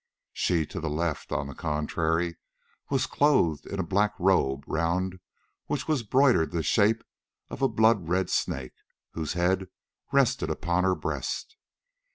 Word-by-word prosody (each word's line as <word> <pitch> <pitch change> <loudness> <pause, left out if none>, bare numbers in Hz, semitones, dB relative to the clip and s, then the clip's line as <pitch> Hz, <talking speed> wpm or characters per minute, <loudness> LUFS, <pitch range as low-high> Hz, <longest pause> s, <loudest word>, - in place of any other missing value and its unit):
She 85 -3 +1
to 95 - -6
the 80 -2 -3
left, 80 0 -2
on 70 - -1
the 70 - -7
contrary, 80 +3 -1 0.5
was 135 -2 +1
clothed 130 - +2
in 100 - -5
a - - +1
black 100 +4 +1
robe 70 -8 +2
round 90 +3 -1 0.5
which - - -2
was 155 -5 +1
broidered 125 - +3
the 85 -2 -2
shape 110 +7 +3 0.5
of - - -7
a 135 - +5
blood 110 -6 +3
red 95 +1 +1
snake, 65 -2 -1 0.4
whose 80 -2 -3
head 95 +2 +1 0.4
rested - - +2
upon 85 +2 0
her 95 -1 +3
breast. 445 - -4
90 Hz, 150 wpm, -27 LUFS, 80-105 Hz, 0.5 s, a